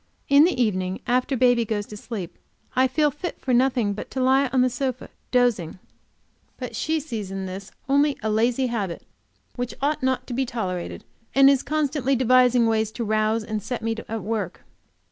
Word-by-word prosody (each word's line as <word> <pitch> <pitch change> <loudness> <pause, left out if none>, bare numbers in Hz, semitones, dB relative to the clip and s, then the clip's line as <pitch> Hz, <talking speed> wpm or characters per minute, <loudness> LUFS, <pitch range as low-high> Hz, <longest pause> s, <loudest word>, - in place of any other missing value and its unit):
In 280 +2 +7
the 350 -7 0
evening, 185 -5 0
after 255 +2 +1
baby 245 -1 +4
gets 210 -2 -2
to 210 - -8
sleep, 205 -5 -7 0.4
I 260 +1 +4
feel 295 +3 +2
fit 325 +6 -6
for 255 - -1
nothing 245 -4 +2
but 205 - -7
to 265 - -4
lie 265 +2 +4
on 260 0 +1
the 255 - +4
sofa, 255 0 -3 0.2
dozing; 240 -10 +1 0.8
but - - -6
she 315 0 0
sees 230 -10 -5
in 195 0 -4
this 190 +1 -7 0.2
only 285 +1 +3
a 220 - 0
lazy 235 +4 +2
habit, 210 -8 -3 0.5
which 245 -1 -3
ought 295 +2 0
not 260 0 0
to 250 - -6
be 265 +3 +1
tolerated, 205 -9 -4 0.3
and 275 0 +7
is 270 -2 +2
constantly 290 -3 0
devising 250 -1 +4
ways 220 -1 +1
to 235 - -3
rouse 215 +1 +1
and 215 -1 -3
set 240 +4 -5
me 225 0 0
at 225 0 -4
work. 220 -1 -3
245 Hz, 185 wpm, -24 LUFS, 215-265 Hz, 0.8 s, In